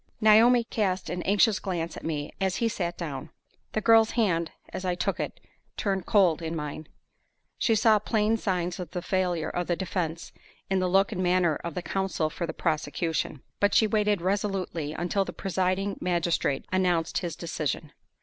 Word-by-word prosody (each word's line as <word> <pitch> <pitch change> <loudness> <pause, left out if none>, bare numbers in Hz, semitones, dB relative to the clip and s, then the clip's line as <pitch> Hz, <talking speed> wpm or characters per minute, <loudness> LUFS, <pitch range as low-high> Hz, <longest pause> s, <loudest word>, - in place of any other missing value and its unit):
Naomi 230 +3 +6
cast 195 -5 -1
an 180 0 -3
anxious 205 +2 +3
glance 170 -4 -3
at - - -9
me 150 -3 -3
as 190 -1 +1
he 230 +4 +1
sat 175 -6 -2
down. 150 -3 -5 0.4
The 215 - 0
girl's 225 0 +6
hand, 170 -7 +2 0.2
as - - -6
I 180 -1 0
took 175 - -1
it, - - -4 0.4
turned 195 -4 -1
cold 180 -6 +4
in 165 0 -3
mine. 150 0 -5 0.7
She 225 - +3
saw 215 0 +5
plain 215 +1 +1
signs 180 -3 -2
of 180 -3 -5
the 175 +1 -5
failure 180 -4 0
of 175 -1 -2
the 175 - +1
defense 170 -3 -3 0.4
in 190 - +3
the 185 0 +1
look 195 +3 +3
and 185 -4 -2
manner 180 -3 +2
of 170 -2 -6
the 180 - -3
counsel 190 -5 -1
for 170 +1 -4
the - - -2
prosecution; 155 -1 -2 0.2
but 205 0 +3
she 220 - +6
waited 210 -3 +1
resolutely 190 -5 -1
until 175 +4 0
the - - -7
presiding 190 +1 -1
magistrate 170 -5 0
announced 180 -3 +1
his 170 -2 -4
decision. 155 -2 -3
185 Hz, 180 wpm, -27 LUFS, 170-200 Hz, 0.7 s, Naomi